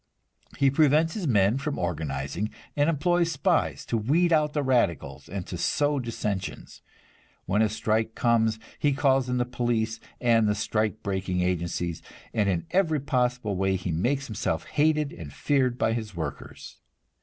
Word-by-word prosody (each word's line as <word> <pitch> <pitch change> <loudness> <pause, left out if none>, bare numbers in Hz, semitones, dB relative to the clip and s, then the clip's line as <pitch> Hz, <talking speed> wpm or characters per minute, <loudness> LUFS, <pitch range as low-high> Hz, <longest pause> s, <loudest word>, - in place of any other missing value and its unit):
He 140 -1 +4
prevents 155 +3 +3
his 195 -7 -3
men 105 +1 +3
from 145 +1 -3
organizing, 80 +2 -3 0.3
and 145 +2 +3
employs 170 +2 +2
spies 165 +5 0
to 115 - -1
weed 165 +10 +2
out 150 -1 +2
the 150 - 0
radicals 120 - 0
and 95 0 -4
to 90 - -6
sow 145 +8 +1
dissensions. 105 -5 -4 0.6
When 105 +3 +1
a 110 - +3
strike 110 +1 -1
comes, 115 -2 +2 0.2
he 145 -1 +2
calls 135 -2 +2
in 125 - 0
the 125 - +1
police 120 -2 -1 0.2
and 115 -3 +3
the 105 - +1
strike 110 +1 -1
breaking 95 -2 -1
agencies, 85 -1 -2 0.3
and 105 -3 +1
in 85 -3 -1
every 165 -5 +2
possible 125 -6 0
way 95 0 +1
he 90 -1 -3
makes 125 - 0
himself 110 -6 -2
hated 150 -1 +1
and 80 -5 -9
feared 130 - +1
by 110 - +1
his 110 -4 -4
workers. 80 - -7
115 Hz, 160 wpm, -26 LUFS, 95-145 Hz, 0.6 s, He